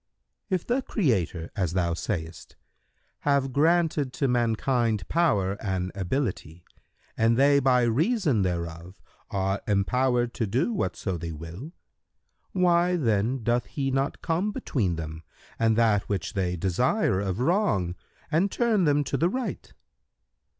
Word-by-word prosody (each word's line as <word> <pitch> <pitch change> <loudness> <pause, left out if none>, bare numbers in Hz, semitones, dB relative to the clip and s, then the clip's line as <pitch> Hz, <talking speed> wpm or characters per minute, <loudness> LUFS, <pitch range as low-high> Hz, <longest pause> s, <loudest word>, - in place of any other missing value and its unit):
Q 190 - +1
"If 180 - -3
the 250 +3 +1
Creator, 95 - -1
as 90 -5 -1
thou 85 -2 +1
sayest, 80 -1 -5 0.6
have 140 -2 +1
granted 160 -2 +2
to 140 - 0
mankind 115 -3 +1
power 105 - +2
and 95 -3 -2
ability[FN#130] 95 - -3 0.5
and 115 +1 +3
they 140 +1 +5
by 125 -2 +3
reason 145 - +2
thereof 85 0 -4 0.3
are 95 0 -1
empowered 120 +4 +1
to 115 - -2
do 130 - 0
whatso 95 - -2
they 85 +1 -5
will, 85 - -8 0.8
why 180 -1 +3
then 115 - 0
doth 120 0 +1
He 135 +8 -2
not 135 +1 -1
come 175 +6 0
between 100 - -1
them 80 0 -6 0.4
and 115 -1 +3
that 110 -3 +2
which 95 -3 -2
they 90 -3 -1
desire 95 - +1
of 95 -2 -2
wrong 125 - +1 0.4
and 170 +6 +2
turn 220 -4 +1
them 145 -1 +3
to - - -2
the 170 - +2
right?" 255 +4 -4
120 Hz, 135 wpm, -26 LUFS, 95-145 Hz, 0.8 s, they